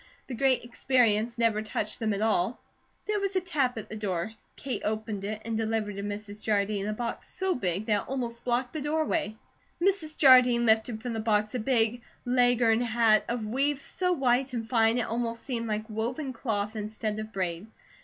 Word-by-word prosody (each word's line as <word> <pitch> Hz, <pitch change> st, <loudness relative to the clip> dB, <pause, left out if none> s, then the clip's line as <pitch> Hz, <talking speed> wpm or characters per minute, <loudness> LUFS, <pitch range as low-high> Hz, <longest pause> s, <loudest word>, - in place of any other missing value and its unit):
The 265 Hz, -, -7 dB
Great 260 Hz, 0 st, +2 dB
Experience 240 Hz, -2 st, +1 dB
never 225 Hz, -2 st, +2 dB
touched 215 Hz, 0 st, -3 dB
them 220 Hz, -1 st, 0 dB
at 205 Hz, +1 st, -1 dB
all." 220 Hz, 0 st, +1 dB, 0.5 s
There 420 Hz, -1 st, 0 dB
was 395 Hz, -1 st, -2 dB
a -, -, +4 dB
tap 290 Hz, -9 st, -1 dB
at 220 Hz, -, -6 dB
the -, -, -7 dB
door. 205 Hz, -1 st, -2 dB, 0.2 s
Kate 265 Hz, -1 st, -4 dB
opened 215 Hz, -2 st, -3 dB
it 215 Hz, +2 st, -4 dB
and 230 Hz, -1 st, -2 dB
delivered 220 Hz, -2 st, -1 dB
to -, -, -3 dB
Mrs. 205 Hz, +1 st, -6 dB
Jardine 205 Hz, -1 st, 0 dB
a 215 Hz, -, -1 dB
box 230 Hz, +1 st, -4 dB
so 380 Hz, -1 st, 0 dB
big 190 Hz, -, -2 dB
that 210 Hz, -2 st, +2 dB
it -, -, -13 dB
almost 240 Hz, -3 st, -3 dB
blocked 245 Hz, +1 st, 0 dB
the 310 Hz, -, -3 dB
doorway. 305 Hz, -4 st, 0 dB, 0.4 s
Mrs. 345 Hz, -4 st, 0 dB
Jardine 250 Hz, -3 st, +7 dB
lifted 220 Hz, 0 st, +2 dB
from 245 Hz, -2 st, -3 dB
the 225 Hz, -, -2 dB
box 215 Hz, -1 st, +1 dB
a 250 Hz, -, -1 dB
big 235 Hz, 0 st, +1 dB, 0.2 s
Leghorn 245 Hz, -2 st, +3 dB
hat 225 Hz, -2 st, +3 dB
of 235 Hz, -2 st, -2 dB
weave 270 Hz, +5 st, 0 dB
so 360 Hz, +6 st, -1 dB
white 265 Hz, -4 st, +2 dB
and 225 Hz, -2 st, -3 dB
fine 225 Hz, -1 st, +3 dB
it 245 Hz, -, +1 dB
almost 230 Hz, 0 st, -3 dB
seemed 235 Hz, -3 st, -3 dB
like 215 Hz, 0 st, -2 dB
woven 245 Hz, +6 st, -3 dB
cloth 215 Hz, -3 st, -2 dB
instead 215 Hz, 0 st, -3 dB
of 215 Hz, 0 st, -6 dB
braid. 185 Hz, -1 st, -3 dB
230 Hz, 195 wpm, -28 LUFS, 215-255 Hz, 0.5 s, Jardine